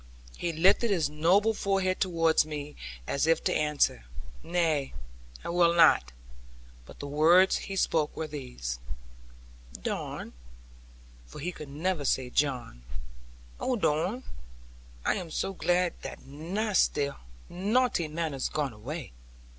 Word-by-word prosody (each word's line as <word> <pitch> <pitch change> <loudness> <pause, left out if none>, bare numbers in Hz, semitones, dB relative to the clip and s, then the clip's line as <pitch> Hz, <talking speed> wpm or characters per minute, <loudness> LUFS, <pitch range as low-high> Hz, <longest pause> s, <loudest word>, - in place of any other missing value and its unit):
He 170 - -2
lifted 190 +8 +4
his 165 -7 +1
noble 185 +9 +3
forehead 195 -2 0
towards 165 -3 +3
me, 150 -1 -6 0.3
as 140 - 0
if 165 - +3
to - - +1
answer, 150 - +1 0.4
"Nay, 165 -5 0 0.5
I - - -5
will 170 0 +4
not": 160 - +5 0.8
but - - -13
the - - -5
words 165 +6 +5
he 195 - -3
spoke 160 -5 +1
were 160 - -2
these: 125 - -5 1.0
'Don,' - - -4 0.9
for - - -12
he 175 +5 -3
could 150 -4 -9
never 160 +2 -1
say 130 -2 0
'John' 125 - -1 0.8
'oh, 255 - 0
Don, 195 +6 0 0.8
I - - +2
am 175 - -5
so 195 +4 -2
glad 180 -1 +1
that - - -8
nasty 160 0 0 0.4
naughty 205 -1 +1
man 155 0 -3
is 135 - -2
gone 145 -5 -2
away. 130 +8 -7
160 Hz, 130 wpm, -29 LUFS, 145-180 Hz, 1.0 s, not